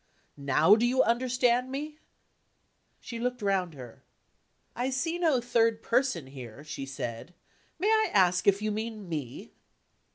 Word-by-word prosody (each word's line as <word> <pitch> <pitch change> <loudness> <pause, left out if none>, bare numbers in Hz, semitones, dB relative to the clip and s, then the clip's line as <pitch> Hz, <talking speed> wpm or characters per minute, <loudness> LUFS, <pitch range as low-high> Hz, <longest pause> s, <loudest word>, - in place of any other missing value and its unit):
Now, 145 +7 +4
do 225 - 0
you 250 +2 +3
understand 250 +1 +1
me?" 300 +3 -5 1.0
She 235 - -7
looked 245 -1 -3
round 185 -5 0
her. 125 -4 -11 0.7
"I 245 +3 -1
see 325 +6 -2
no 315 -7 +3
third 230 -2 +1
person 235 - +1
here," 130 -1 -10
she 150 -3 -6
said. 135 +4 -6 0.4
"May 395 +5 0
I 435 -1 +3
ask 185 -1 +3
if 200 +1 +4
you 215 - 0
mean 215 -1 -5
me?" 150 -8 -6
220 Hz, 140 wpm, -28 LUFS, 160-250 Hz, 1.0 s, Now